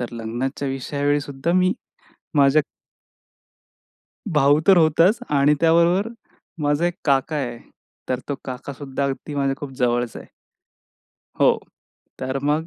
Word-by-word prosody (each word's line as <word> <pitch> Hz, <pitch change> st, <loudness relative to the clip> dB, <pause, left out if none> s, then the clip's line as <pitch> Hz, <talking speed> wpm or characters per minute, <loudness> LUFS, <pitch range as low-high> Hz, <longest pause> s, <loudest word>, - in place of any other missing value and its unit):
तर 120 Hz, -1 st, -5 dB
लग्नाच्या 120 Hz, +5 st, -3 dB
विषयावेळी 145 Hz, +2 st, -1 dB
सुद्धा 140 Hz, +3 st, -3 dB
मी 185 Hz, +1 st, +3 dB, 0.6 s
माझ्या 145 Hz, +1 st, +5 dB, 1.7 s
भाऊ 145 Hz, 0 st, +4 dB
तर 195 Hz, -, +7 dB
होताच 165 Hz, +6 st, +4 dB, 0.2 s
आणि 145 Hz, +2 st, +4 dB
त्याबरोबर 170 Hz, +5 st, +3 dB, 0.5 s
माझा 145 Hz, +4 st, +2 dB
एक 175 Hz, -, -1 dB
काका 140 Hz, +2 st, +1 dB
आहे. 120 Hz, -4 st, -3 dB, 0.5 s
तर 125 Hz, -, 0 dB
तो 145 Hz, -, -1 dB
काकासुद्धा 135 Hz, +1 st, -5 dB
अगदी 140 Hz, +2 st, -4 dB
माझ्या 140 Hz, -1 st, 0 dB
खूप 145 Hz, -2 st, -7 dB
जवळचा 120 Hz, -1 st, 0 dB
आहे. -, -, -13 dB, 1.1 s
हो, -, -, +5 dB, 0.6 s
तर 130 Hz, +1 st, -2 dB
मग 150 Hz, +3 st, 0 dB
140 Hz, 125 wpm, -22 LUFS, 135-155 Hz, 1.7 s, तर